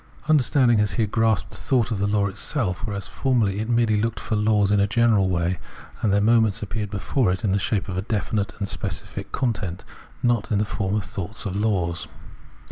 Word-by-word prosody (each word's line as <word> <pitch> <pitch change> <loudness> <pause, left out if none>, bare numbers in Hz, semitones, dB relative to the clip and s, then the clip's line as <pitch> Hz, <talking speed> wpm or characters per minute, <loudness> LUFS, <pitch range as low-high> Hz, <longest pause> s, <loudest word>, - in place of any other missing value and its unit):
Understanding 130 -6 +4
has 105 0 +1
here 115 - +1
grasped 110 -3 +1
the - - -6
thought 125 -3 +1
of 105 - -1
the 100 - +1
law 105 -1 +2
itself, 100 - -2
whereas 100 -1 -4
formerly 115 -7 0
it 110 +2 -3
merely 115 -3 +2
looked 115 0 -1
for 110 - -2
laws 105 -1 +2
in 105 - +4
a 100 - +3
general 110 -3 +3
way, 85 -1 0 0.4
and 105 - +2
their 100 - +3
moments 110 -1 +3
appeared 105 0 -3
before 100 +2 0
it 95 +4 -3
in 100 - +1
the 100 - +2
shape 100 +1 -1
of 90 -2 -4
a - - 0
definite 105 -1 -1
and 100 - -3
specific - - -4
content, 100 -8 -2 0.4
and - - +3
not 115 -3 0
in 105 - +3
the 105 - +1
form 100 -1 -2
of 105 - 0
thoughts 105 +5 -6
of 95 -2 -3
laws. 90 -6 0
105 Hz, 210 wpm, -24 LUFS, 100-115 Hz, 0.4 s, Understanding